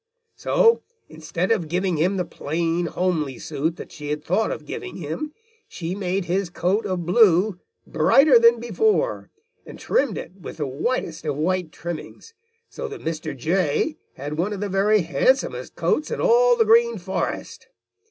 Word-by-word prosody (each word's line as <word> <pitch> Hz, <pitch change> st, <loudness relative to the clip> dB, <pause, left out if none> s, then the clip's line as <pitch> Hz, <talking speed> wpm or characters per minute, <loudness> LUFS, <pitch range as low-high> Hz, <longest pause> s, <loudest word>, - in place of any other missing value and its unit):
"So 460 Hz, -1 st, +3 dB, 0.3 s
instead 160 Hz, +5 st, -3 dB
of 180 Hz, -8 st, +1 dB
giving 180 Hz, +1 st, 0 dB
him 180 Hz, +6 st, +1 dB
the 180 Hz, -, -1 dB
plain, 165 Hz, +2 st, -2 dB
homely 160 Hz, -8 st, -1 dB
suit 160 Hz, +4 st, -2 dB
that -, -, -10 dB
she 150 Hz, -2 st, -8 dB
had 150 Hz, 0 st, -3 dB
thought 190 Hz, +7 st, +1 dB
of -, -, -5 dB
giving 395 Hz, -5 st, -6 dB
him, 170 Hz, -, -5 dB, 0.4 s
she 170 Hz, -, -5 dB
made 190 Hz, -1 st, -2 dB
his 185 Hz, +1 st, -1 dB
coat 185 Hz, +5 st, 0 dB
of 180 Hz, -3 st, -2 dB
blue 185 Hz, 0 st, +4 dB, 0.3 s
brighter 275 Hz, -3 st, +5 dB
than 235 Hz, 0 st, +5 dB
before 440 Hz, -, 0 dB, 0.3 s
and -, -, -11 dB
trimmed 265 Hz, -8 st, 0 dB
it 180 Hz, -, -7 dB
with -, -, -8 dB
the 150 Hz, -, -2 dB
whitest 160 Hz, -, -3 dB
of 145 Hz, -3 st, -2 dB
white 175 Hz, +1 st, -1 dB
trimmings, 170 Hz, -, -8 dB, 0.3 s
so 485 Hz, -, -6 dB
that 425 Hz, -1 st, -8 dB
Mr. 155 Hz, -3 st, -4 dB
Jay 170 Hz, -, 0 dB, 0.2 s
had 145 Hz, +3 st, -6 dB
one 195 Hz, +5 st, 0 dB
of 200 Hz, -, -5 dB
the 205 Hz, 0 st, -3 dB
very 200 Hz, +1 st, +3 dB
handsomest 170 Hz, -, 0 dB
coats 300 Hz, -, 0 dB
in -, -, -3 dB
all -, -, +5 dB
the 450 Hz, -, +4 dB
Green 470 Hz, +1 st, +4 dB
Forest. -, -, -4 dB
185 Hz, 165 wpm, -23 LUFS, 160-235 Hz, 0.4 s, brighter